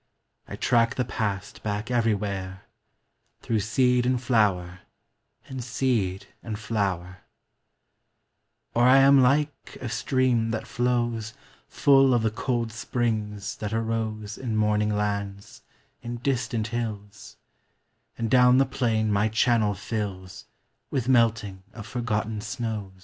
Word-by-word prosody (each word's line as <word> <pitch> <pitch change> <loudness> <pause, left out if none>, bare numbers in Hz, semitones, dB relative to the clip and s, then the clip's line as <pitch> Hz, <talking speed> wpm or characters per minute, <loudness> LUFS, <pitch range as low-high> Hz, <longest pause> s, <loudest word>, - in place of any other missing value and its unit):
I - - -6
track 115 -1 +2
the 125 - 0
past 105 -4 -3
back 105 +2 -3
everywhere 100 -5 -1 0.8
Through 115 -2 0
seed 125 +4 +2
and 125 0 +1
flower 100 -8 +1 0.7
and 130 -2 -6
seed 110 -6 -1 0.2
and 110 -2 -5
flowi 95 -4 -2 1.6
Or 120 - +1
I 130 +2 +7
am 135 0 +7
like 145 +3 0
a 125 - -5
stream 125 -2 +1
that 110 0 -3
flows 120 -3 -1 0.3
Full 135 -2 +4
of 115 - +1
the 110 - +1
cold 120 0 -2
springs 110 -3 -2
that 105 0 -4
aro 110 -2 -3
In 120 -4 -3
morning 105 0 +2
lands, 100 -1 -3 0.4
in 120 0 -5
distant 120 -3 -1
hills; 105 -4 -6 0.8
And 115 - -1
down 125 0 +6
the 135 - +5
plain 115 -5 0
my 105 +2 +2
channel 110 -1 +2
flUa 100 -2 -5 0.4
With 130 -3 -2
melting 110 -6 +2
of 110 -4 -9
forgotten 110 -2 -2
snows. 110 -3 -4
110 Hz, 120 wpm, -26 LUFS, 105-125 Hz, 1.6 s, I